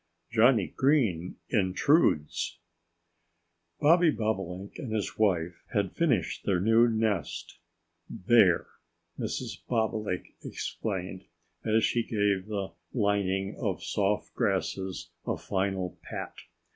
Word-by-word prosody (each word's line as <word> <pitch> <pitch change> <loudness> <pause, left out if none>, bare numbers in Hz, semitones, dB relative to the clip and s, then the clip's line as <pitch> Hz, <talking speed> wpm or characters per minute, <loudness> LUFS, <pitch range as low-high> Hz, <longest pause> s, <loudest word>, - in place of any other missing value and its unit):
IX - - -10
JOHNNIE 115 -3 +4
GREEN 115 - +2 0.2
INTRUDES 95 - +2 1.2
BOBBY 165 +3 +6
BOBOLINK 95 -3 -3
and 120 - -5
his 110 -2 -2
wife 90 -5 +1
had 100 -3 0
finished 125 - +1
their 95 -3 +1
new 115 +5 +5
nest. 110 -4 -1 0.5
"There!" 95 -3 +4 0.5
Mrs. - - -4
Bobolink 110 -5 -1
exclaimed, 95 -3 -4 0.4
as 110 0 +2
she 120 - +2
gave 100 -4 0
the 100 -3 -3 0.2
lining 100 -3 0
of 105 -8 -2
soft 105 0 0
grasses 95 -2 -2 0.2
a - - 0
final 95 -1 -2
pat. - - -6
100 Hz, 105 wpm, -29 LUFS, 95-115 Hz, 1.2 s, BOBBY